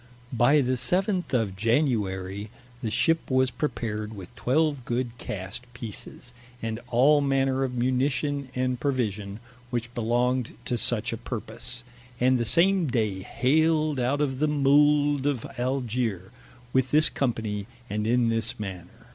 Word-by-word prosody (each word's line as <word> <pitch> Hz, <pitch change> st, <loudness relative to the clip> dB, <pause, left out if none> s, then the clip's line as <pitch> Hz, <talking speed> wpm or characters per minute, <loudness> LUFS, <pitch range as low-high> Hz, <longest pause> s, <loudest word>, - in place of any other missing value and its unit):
By 130 Hz, +5 st, +4 dB
the 130 Hz, 0 st, 0 dB
seventh 185 Hz, -, +1 dB
of 110 Hz, -7 st, 0 dB
Januarie, 105 Hz, -4 st, 0 dB, 0.3 s
the 115 Hz, -, -2 dB
ship 165 Hz, +9 st, +1 dB
was 130 Hz, -1 st, +2 dB
prepared 110 Hz, -7 st, -3 dB
with 95 Hz, -3 st, -10 dB
twelve 145 Hz, 0 st, +1 dB
good 120 Hz, 0 st, -2 dB
cast 105 Hz, +6 st, -6 dB
Pieces, 120 Hz, +1 st, -7 dB, 0.3 s
and 115 Hz, -1 st, -3 dB
all 140 Hz, +5 st, +4 dB
manner 135 Hz, -1 st, +1 dB
of 125 Hz, -2 st, -2 dB
munition 130 Hz, +3 st, 0 dB
and 125 Hz, -1 st, 0 dB
provision, 110 Hz, -7 st, -2 dB, 0.3 s
which 120 Hz, -1 st, -3 dB
belonged 120 Hz, +1 st, 0 dB
to 125 Hz, -, -1 dB
such 115 Hz, 0 st, 0 dB
a -, -, -3 dB
purpose, 120 Hz, +2 st, -4 dB, 0.4 s
and 130 Hz, 0 st, +3 dB
the 120 Hz, -, 0 dB
same 180 Hz, -, +4 dB
day 110 Hz, -7 st, 0 dB
haled 155 Hz, -, +1 dB
out 130 Hz, +4 st, +1 dB
of 130 Hz, -3 st, -1 dB
the 155 Hz, -, +2 dB
Mould 145 Hz, 0 st, +3 dB
of 135 Hz, -6 st, -1 dB
Algier, 120 Hz, -7 st, -1 dB, 0.4 s
with 130 Hz, -1 st, +2 dB
this 155 Hz, +1 st, +5 dB
company, 110 Hz, -6 st, -2 dB, 0.2 s
and 105 Hz, 0 st, -2 dB
in 120 Hz, 0 st, +3 dB
this 115 Hz, -1 st, -1 dB
manner. 95 Hz, -4 st, -8 dB
125 Hz, 140 wpm, -26 LUFS, 110-140 Hz, 0.4 s, this